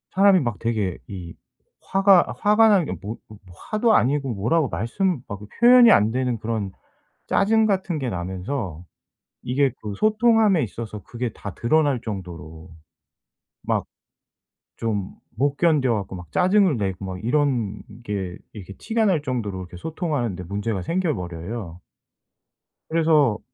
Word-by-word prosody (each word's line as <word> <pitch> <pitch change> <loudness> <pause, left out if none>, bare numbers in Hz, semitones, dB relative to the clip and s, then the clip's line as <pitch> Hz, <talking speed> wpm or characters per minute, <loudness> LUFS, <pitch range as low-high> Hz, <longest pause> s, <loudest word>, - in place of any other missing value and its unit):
사람이 195 -1 +6
막 120 -5 -2
되게 110 -6 -1
이 90 -4 -8 0.6
화가 195 -2 +5
화가 220 +1 +5
난 195 -5 +4
게 - - -4
뭐 105 +3 -5
어 - - -13
뭐 105 -2 -13 0.3
화도 220 +1 +3
아니고 135 0 +1
뭐라고 125 +9 +1
말씀 175 - -1
막 100 -1 -7 0.2
표현이 240 -1 +8
안 105 +2 +4
되는 125 -1 -1
그런 110 -3 -3 0.6
짜증 220 +2 +3
같은 190 -5 -1
게 130 -3 -2
나면서 90 - -4 0.6
이게 130 +2 +1
또 105 -2 -5
소통함에 215 - +3
있어서 110 0 -6
그게 120 -1 -4
다 100 - -8
드러날 140 0 +1
정도로 85 -5 -8 0.9
막 - - -1 0.9
좀 105 -4 -2 0.3
못 140 +2 +1
견뎌 150 -8 +2
갖고 100 -3 -4
막 90 -3 -11
짜증을 185 - +3
내고 95 -2 -3
막 95 0 -6
이런 120 -6 0 0.2
게 95 -4 -4 0.2
이렇게 100 -2 -9
티가 225 0 0
날 175 -7 +2
정도로 115 -9 -3
이렇게 90 -1 -9
소통하는 145 - -2
데 90 - -6
문제가 100 +1 -3
생겨 170 - 0
버려요. 90 +1 -6 1.1
그래서 155 -9 +3
120 Hz, 275 characters per minute, -23 LUFS, -, 1.1 s, 표현이